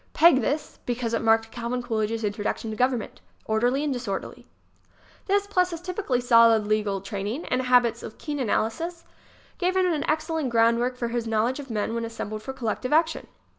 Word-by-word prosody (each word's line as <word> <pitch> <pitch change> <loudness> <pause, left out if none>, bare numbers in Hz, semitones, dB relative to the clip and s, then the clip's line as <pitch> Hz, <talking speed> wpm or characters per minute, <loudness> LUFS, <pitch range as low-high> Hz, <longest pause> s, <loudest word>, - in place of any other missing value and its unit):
Peg 325 -5 +6
this, 295 +2 -2
be 245 - 0
cause 235 -1 -3
it 230 - +1
marked 225 0 +3
Calvin 240 +1 -3
Coolidge's 225 -1 -1
introduction 210 +2 -2
to - - -4
government 250 -1 -1
ŌĆö - - -36
orderly 245 +6 +2
and 295 -2 0
disorderly. 235 -6 -5 0.8
This, 400 0 +2
plus 365 -3 +1
his 335 -2 -5
typically 360 -8 -1
solid 230 -3 +5
legal 210 -2 0
training 205 - -4
and 255 - 0
habits 245 -2 +3
of 215 - -9
keen 295 -2 -4
analysis, 325 +9 -1 0.6
gave 370 0 +1
him 375 - +3
an 300 - -2
excellent 315 -2 0
groundwork 235 +2 +2
for 235 -1 -2
his 235 -1 -2
knowledge 225 +5 0
of 275 -2 -8
men 225 0 -2
when 230 0 -2
assembled 215 -2 -5
for 265 - -5
collective 255 0 -3
action. 320 +1 +2
245 Hz, 185 wpm, -25 LUFS, 225-290 Hz, 0.8 s, Peg